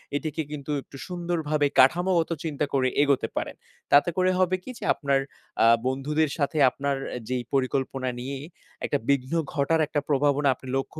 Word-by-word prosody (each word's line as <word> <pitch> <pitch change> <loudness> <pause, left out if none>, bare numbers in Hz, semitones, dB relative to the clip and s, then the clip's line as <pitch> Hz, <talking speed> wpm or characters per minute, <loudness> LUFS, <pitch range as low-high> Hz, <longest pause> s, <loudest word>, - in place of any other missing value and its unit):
এটিকে 155 +2 -2
কিন্তু 150 -1 -5
একটু 140 - -13
সুন্দরভাবে 165 -4 0
কাঠামোগত 170 +5 +4
চিন্তা 150 -2 -1
করে 130 -2 +2
এগোতে 140 -2 +2
পারেন। - - -3 0.4
তাতে 145 +4 +6
করে 185 0 +3
হবে 185 0 +3
কি - - -10
যে - - -9
আপনার 140 -2 +1 0.4
আ - - +6 0.2
বন্ধুদের 150 +4 0
সাথে 145 0 -1
আপনার 140 +2 -2 0.3
যেই 125 -1 -1
পরিকল্পনা 130 -1 0
নিয়ে 135 +3 -4 0.5
একটা 145 - +1
বিঘ্ন 135 0 +1 0.2
ঘটার 150 +3 +1
একটা 145 -1 -1
প্রভাবনা 145 0 +2
আপনি 130 - -14
লক্ষ্য 135 +3 -5
145 Hz, 160 wpm, -26 LUFS, 135-160 Hz, 0.5 s, তাতে